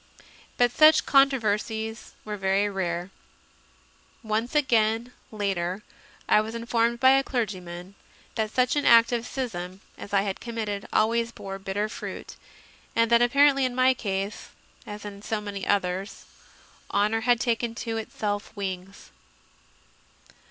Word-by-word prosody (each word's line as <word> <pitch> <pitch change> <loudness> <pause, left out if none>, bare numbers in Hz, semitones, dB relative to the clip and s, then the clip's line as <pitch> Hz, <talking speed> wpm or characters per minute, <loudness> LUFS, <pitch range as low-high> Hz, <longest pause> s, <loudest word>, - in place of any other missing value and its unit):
But 245 -1 +4
such 310 +4 +6
controversies 225 -5 +1
were 210 -1 -4
very 195 +1 +1
rare. 180 -2 -3 1.1
Once 225 +4 -2
again, 235 -3 +2 0.2
later, 195 -2 -2 0.4
I 210 - +5
was 220 +2 -6
informed 235 0 0
by 260 +1 +6
a 270 0 +4
clergyman 185 -7 -4 0.4
that 220 -2 -1
such 250 +4 +1
an 290 - +1
act 230 0 +6
of 235 0 -2
schism 190 -8 -5 0.2
as - - -9
I 200 -1 +3
had 195 -2 -3
committed 215 -4 -4
always 230 +2 +2
bore 195 -3 -7
"bitter 195 +2 -2
fruit," 215 - -7 0.6
and 230 0 +2
that 235 0 +6
apparently 275 +3 +4
in 255 -1 -1
my 255 +1 +4
case, 200 -3 -4 0.4
as 210 0 -8
in 200 -1 -8
so 215 +1 -2
many 200 -2 -6
others, 195 0 -1 0.7
"honour 215 +2 +1
had 240 0 +3
taken 235 -1 -1
to 225 -1 -2
itself 205 -2 -3
wings." 190 -1 -6
215 Hz, 135 wpm, -26 LUFS, 200-235 Hz, 1.1 s, such